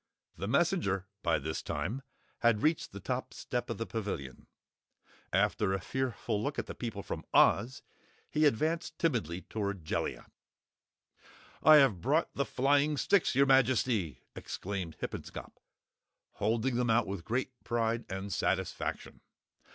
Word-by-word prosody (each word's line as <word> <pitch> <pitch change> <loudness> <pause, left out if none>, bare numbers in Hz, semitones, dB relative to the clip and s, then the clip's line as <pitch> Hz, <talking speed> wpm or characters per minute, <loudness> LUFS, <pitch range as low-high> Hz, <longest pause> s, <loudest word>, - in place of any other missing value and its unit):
The 100 - -4
messenger, 120 - +1 0.2
by 85 -3 +2
this 80 +2 -3
time 85 - -3 0.4
had 115 0 +3
reached 155 +1 +1
the 100 - -8
top 125 +6 -3
step 125 -1 -3
of 115 - -3
the 115 - -2
Pavilion. 95 - -5 0.8
After 100 -3 +2
a 95 - 0
fearful 120 -1 -2
look 140 +4 -2
at - - -1
the - - -6
people 110 -5 -5
from - - -5
Oz, 120 +5 +4 0.5
he 155 0 +4
advanced 160 +6 0
timidly 90 - 0
toward 100 -5 -4
Jellia. - - -2 1.4
"I 155 +1 +8
have 135 - +5
brought 150 +7 +1
the 140 - 0
flying 145 +3 +2
sticks, 190 -1 +3
your 140 +1 +6
Majesty!" 125 - +2
explained 95 -4 -5
Hippenscop, - - -7 0.7
holding 115 +4 0
them 125 -1 +1
out 115 +2 +4
with 95 -3 -5
great 130 +5 -1
pride 115 0 0
and 95 +1 -4
satisfaction. 95 -1 -2
115 Hz, 135 wpm, -31 LUFS, 95-135 Hz, 1.4 s, I